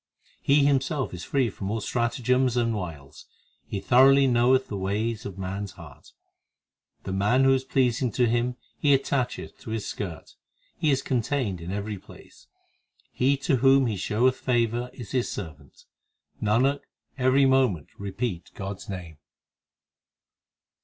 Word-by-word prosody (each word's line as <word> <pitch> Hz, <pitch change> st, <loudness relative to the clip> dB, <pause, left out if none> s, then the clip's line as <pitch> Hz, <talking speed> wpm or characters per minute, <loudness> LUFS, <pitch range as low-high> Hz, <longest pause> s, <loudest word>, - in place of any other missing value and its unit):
He 140 Hz, 0 st, +4 dB
Himself 140 Hz, -, 0 dB
is 90 Hz, -1 st, -6 dB
free 130 Hz, -1 st, 0 dB
from 95 Hz, 0 st, -5 dB
all 110 Hz, +2 st, -1 dB
stratagems 125 Hz, +2 st, 0 dB
and 115 Hz, -1 st, +1 dB
wiles; 80 Hz, -7 st, -7 dB, 0.4 s
He 100 Hz, -, -3 dB
thoroughly 135 Hz, +5 st, +5 dB
knoweth 130 Hz, +1 st, +3 dB
the 105 Hz, -, -5 dB
ways 105 Hz, +4 st, -2 dB
of 100 Hz, -1 st, -9 dB
man 95 Hz, +2 st, -4 dB
s 100 Hz, -, -10 dB
heart; -, -, -14 dB, 0.9 s
The -, -, -5 dB
man 105 Hz, +7 st, +3 dB
who 135 Hz, 0 st, +5 dB
is 130 Hz, 0 st, 0 dB
pleasing 125 Hz, -2 st, +1 dB
to 125 Hz, -2 st, +2 dB
Him 120 Hz, +2 st, 0 dB, 0.2 s
He 140 Hz, -2 st, +5 dB
attacheth 130 Hz, -2 st, -3 dB
to -, -, -10 dB
His 110 Hz, -2 st, -3 dB
skirt 90 Hz, -6 st, -6 dB, 0.4 s
He 155 Hz, -, 0 dB
is 135 Hz, -1 st, +1 dB
contained 120 Hz, -, -1 dB
in 85 Hz, -, -7 dB
every 105 Hz, 0 st, -4 dB
place -, -, -16 dB, 0.6 s
He 135 Hz, +3 st, +2 dB
to 135 Hz, -, +3 dB
whom 135 Hz, +2 st, +5 dB
He 110 Hz, -3 st, -1 dB
showeth 120 Hz, +7 st, +1 dB
favour 120 Hz, 0 st, 0 dB
is 120 Hz, -5 st, -10 dB
His 125 Hz, -2 st, 0 dB
servant. 75 Hz, -8 st, -9 dB, 0.6 s
Nanak, 125 Hz, +7 st, +2 dB, 0.4 s
every 130 Hz, +1 st, +3 dB
moment 130 Hz, -, +2 dB
repeat 100 Hz, -2 st, -4 dB
God 100 Hz, -1 st, -5 dB
s -, -, -13 dB
name. 90 Hz, -5 st, -7 dB
120 Hz, 150 wpm, -26 LUFS, 100-130 Hz, 0.9 s, thoroughly